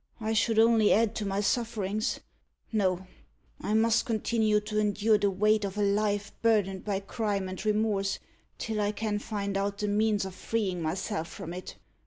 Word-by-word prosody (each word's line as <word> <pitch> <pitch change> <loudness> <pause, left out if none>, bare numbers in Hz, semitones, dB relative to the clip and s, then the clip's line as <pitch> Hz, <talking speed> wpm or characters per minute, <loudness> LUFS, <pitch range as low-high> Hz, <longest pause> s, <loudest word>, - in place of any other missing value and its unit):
I 220 0 -1
should 220 +1 +2
only 225 -1 +5
add 225 0 +3
to 210 - -2
my 195 +1 0
sufferings. 215 -1 -1 0.5
No; 190 -4 +1 0.6
I 210 - 0
must 225 0 +3
continue 220 -1 +1
to 210 0 -2
endure 210 +1 +2
the 200 0 +2
weight 210 +2 +2
of 200 0 -4
a 210 - +2
life 205 0 +1
burdened 205 -5 +2
by 200 -2 -1
crime 200 -2 -2
and 185 0 -6
remorse, 210 -2 +1 0.4
till 220 -2 -2
I 205 0 0
can 210 -1 -2
find 200 -2 -3
out 200 0 -1
the 210 - -2
means 210 -1 +2
of 190 - -6
freeing 190 -3 -2
myself 165 +2 -2
from 175 -2 -7
it. 180 +1 -7
210 Hz, 175 wpm, -29 LUFS, 195-220 Hz, 0.6 s, only